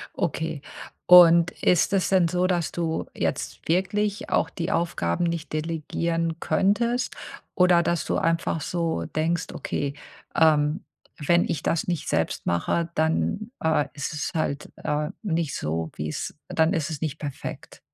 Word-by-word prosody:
Okay. 160 -4 -2 0.4
Und 170 -1 +8
ist 180 +2 +3
es 190 - +2
denn 185 -3 +4
so, 180 +2 +1
dass 175 -3 0
du 165 -2 -2
jetzt - - -3
wirklich 200 +4 0
auch - - +2
die 170 +1 -3
Aufgaben 165 - 0
nicht 170 -2 -3
delegieren 165 +1 -2
könntest 235 +8 +1 0.4
oder 180 -2 +5
dass 170 -1 0
du - - 0
einfach 165 -1 0
so 165 - -1
denkst: 160 - -1
„Okay, 140 -1 -3 0.4
ähm, 155 +2 +3 0.3
wenn 170 +3 +3
ich 155 - -3
das 165 - 0
nicht 170 -4 -2
selbst - - -1
mache, 160 - 0
dann, 160 - 0
äh, 160 -2 +2
ist 145 +2 -4
es 150 - -3
halt, 150 -3 -2
äh, 150 0 -1
nicht 165 -8 -1
so, 80 +1 -2
wie's 75 +1 -4
dann 160 +1 +2
ist 160 -2 -1
es 155 -2 -5
nicht 155 -2 -2
perfekt.“ 145 -3 -7
165 Hz, 145 wpm, -25 LUFS, 150-175 Hz, 0.4 s, Und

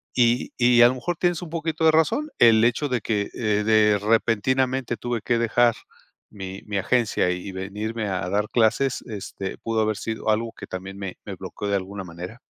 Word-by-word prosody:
y 120 0 +2
y 120 -1 +5
a - - +9
lo 125 - 0
mejor 175 +8 -3
tienes 175 -1 0
un 170 - -8
poquito 160 -1 -2
de 160 - +7
razón, 160 - +2
el 115 -2 +6
hecho 120 +5 +2
de 125 -3 0
que, 100 -1 -1
eh, 105 -2 0
de 105 -1 +4
repentinamente 120 +4 +1
tuve 120 +1 -3
que 120 +2 +1
dejar 115 0 +3 0.6
mi 95 -2 -7
mi 105 -2 -3
agencia 110 -1 +1
y 90 +2 -5
venirme 105 +4 -4
a 95 -2 -2
dar 105 +2 0
clases, 120 +3 +2
este, 100 -3 -6
pudo 115 -1 -1
haber 110 -1 0
sido 110 -1 -4
algo 115 +1 -1
que - - -8
también 95 +1 -7
me 95 -2 -6
me - - -7
bloqueó 105 - -6
de 100 - +1
alguna 95 +1 -4
manera. 90 +6 -9
110 Hz, 195 wpm, -24 LUFS, 100-120 Hz, 0.6 s, a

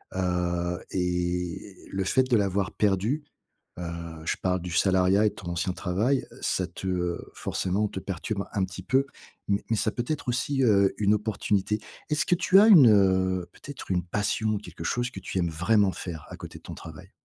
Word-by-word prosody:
Heu, 90 -1 -1
et 90 +1 -2 0.2
le 95 0 -1
fait 130 +7 +3
de 125 -3 +2
l'avoir 100 -1 0
perdu, 105 +9 +1 0.6
heu, - - -4 0.4
je - - 0
parle 90 -1 0
du 90 0 -6
salariat 95 +3 +3
et - - +4
de - - -16
ton 90 -3 -6
ancien 85 +2 -1
travail, 105 +10 0
heu, - - -15
ça 95 - 0
te, 90 +2 -7
heu, 90 -1 -2
forcément 100 +3 -1
te 95 - -6
perturbe 100 +2 -4
un 100 -3 +1
petit 95 0 -9
peu 135 +7 +2 0.4
m 100 0 +3
mais 115 - +1
ça 110 - +1
peut 120 - -3
être 155 -4 -3
aussi, 130 +3 0
heu, 100 -4 +4
une 105 0 +3
opportunité. 105 -1 0 0.3
Est-ce 150 +3 +1
que 180 - +3
tu 185 +2 +5
as 210 - +7
une, 160 - +9
heu, 95 -3 +2
peut-être 145 -8 -9
une 90 -1 +1
passion, 105 +4 0
quelque 105 - -9
chose 120 0 -1
que 95 - -7
tu 95 0 -5
aimes 85 -1 +1
vraiment 95 +5 +2
faire 85 -4 -7
à - - -8
côté - - -9
de - - -31
ton - - -8
travail? - - -11
95 Hz, 200 wpm, -27 LUFS, 90-110 Hz, 0.6 s, une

